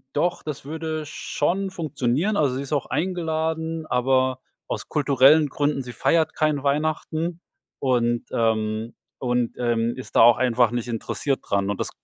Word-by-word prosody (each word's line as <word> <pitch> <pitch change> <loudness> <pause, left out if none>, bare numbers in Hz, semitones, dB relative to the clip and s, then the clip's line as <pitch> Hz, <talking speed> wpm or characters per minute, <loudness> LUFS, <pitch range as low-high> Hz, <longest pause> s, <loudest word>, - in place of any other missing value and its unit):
Doch, 175 +4 0
das 150 -3 -6
würde 155 +1 -4
schon 185 +6 -2
funktionieren. 155 - -1
Also, 140 -4 +2
sie 135 - -2
ist 140 - -8
auch 145 - 0
eingeladen, 160 -2 -2
aber 130 0 +1 0.3
aus - - -5
kulturellen 145 +1 +4
Gründen 145 -2 -1
sie 125 - -7
feiert 160 +7 +1
kein 150 -2 0
Weihnachten 155 +3 -1 0.4
und, 120 -3 +1
ähm 110 0 0 0.2
und, 125 -2 0
ähm, 120 -1 0
ist 130 - -9
da - - +8
auch 120 +1 +7
einfach 120 -2 +3
nicht 120 0 -3
interessiert 130 +4 -2
dran. 100 0 -1
Und 100 - -2
das - - -2
140 Hz, 155 wpm, -24 LUFS, 120-160 Hz, 0.4 s, da